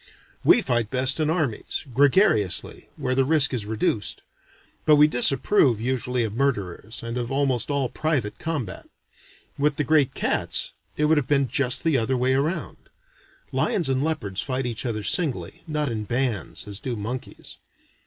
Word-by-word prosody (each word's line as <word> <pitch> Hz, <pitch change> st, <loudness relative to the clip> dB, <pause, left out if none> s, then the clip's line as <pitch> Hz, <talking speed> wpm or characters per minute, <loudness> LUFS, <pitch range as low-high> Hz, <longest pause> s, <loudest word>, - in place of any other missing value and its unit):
We 240 Hz, -, +5 dB
fight 120 Hz, -7 st, 0 dB
best 130 Hz, +3 st, +2 dB
in 155 Hz, -1 st, +1 dB
armies, 155 Hz, -9 st, -2 dB
gregariously, 135 Hz, -, +2 dB
where 130 Hz, -, -2 dB
the 135 Hz, +1 st, +3 dB
risk 145 Hz, -1 st, +4 dB
is 110 Hz, -5 st, -3 dB
reduced; 110 Hz, -2 st, -1 dB, 0.6 s
but 155 Hz, -, +5 dB
we 150 Hz, 0 st, +7 dB
disapprove 135 Hz, -, +3 dB
usually 125 Hz, 0 st, -1 dB
of 110 Hz, -2 st, -3 dB
murderers, 110 Hz, -5 st, -2 dB
and 115 Hz, +1 st, -4 dB
of 120 Hz, +1 st, -4 dB
almost 135 Hz, -3 st, 0 dB
all 140 Hz, -2 st, 0 dB
private 135 Hz, -8 st, -2 dB
combat. 140 Hz, -, -5 dB, 0.7 s
With 145 Hz, +1 st, +2 dB
the 150 Hz, -, 0 dB
great 145 Hz, -1 st, +2 dB
cats, -, -, +1 dB, 0.3 s
it 150 Hz, -, +2 dB
would 155 Hz, +1 st, +3 dB
have 140 Hz, -4 st, 0 dB
been 140 Hz, -2 st, +2 dB
just 130 Hz, +1 st, +1 dB
the 160 Hz, -5 st, +2 dB
other 125 Hz, +3 st, 0 dB
way 130 Hz, +1 st, +1 dB
round. 150 Hz, +7 st, -3 dB, 0.6 s
(Lions 170 Hz, -8 st, +1 dB
and 135 Hz, +1 st, 0 dB
leopards 150 Hz, -12 st, -2 dB
fight 130 Hz, -1 st, -2 dB
each 120 Hz, +1 st, -3 dB
other 110 Hz, -3 st, -3 dB
singly, 155 Hz, -, -1 dB
not 150 Hz, -4 st, -2 dB
in 110 Hz, -2 st, -4 dB
bands, 120 Hz, -3 st, -2 dB
as 100 Hz, -1 st, -5 dB
do 125 Hz, -2 st, -4 dB
monkeys.) 115 Hz, +4 st, -7 dB
130 Hz, 165 wpm, -24 LUFS, 115-150 Hz, 0.7 s, we